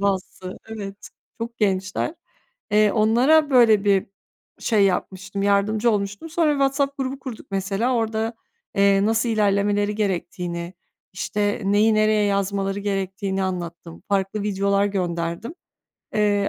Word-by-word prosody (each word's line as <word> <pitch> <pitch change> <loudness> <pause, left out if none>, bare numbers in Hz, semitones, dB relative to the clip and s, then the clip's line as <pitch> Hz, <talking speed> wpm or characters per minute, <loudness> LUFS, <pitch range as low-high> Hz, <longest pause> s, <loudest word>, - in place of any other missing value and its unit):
bazısı 190 -2 -2
evet, 205 -2 -7 0.3
çok 235 +1 -5
gençler. 200 - 0 0.6
Eee, 210 0 +4
onlara 255 +8 +4
böyle 225 -6 +5
bir 195 -2 +3 0.5
şey 210 -4 +2
yapmıştım, 190 +1 -2
yardımcı 210 +3 +2
olmuştum. 205 +8 -3
Sonra 330 -1 +2
bir - - +2
WhatsApp 275 0 +1
grubu 265 0 -3
kurduk 255 -4 -8
mesela, 195 +6 0
orada, 225 0 -1 0.4
eee, 200 0 +4
nasıl 225 +2 +1
ilerlemeleri 205 -1 +1
gerektiğini, 175 -3 -3 0.4
işte, 205 +2 -1
neyi 205 +3 +3
nereye 215 0 +3
yazmaları 200 0 -1
gerektiğini 195 -1 -2
anlattım, 170 -2 -5
farklı 200 +1 0
videolar 200 0 +1
gönderdim. 175 - -3 0.6
Eee, 205 -1 +2
205 Hz, 120 wpm, -23 LUFS, 195-220 Hz, 0.6 s, böyle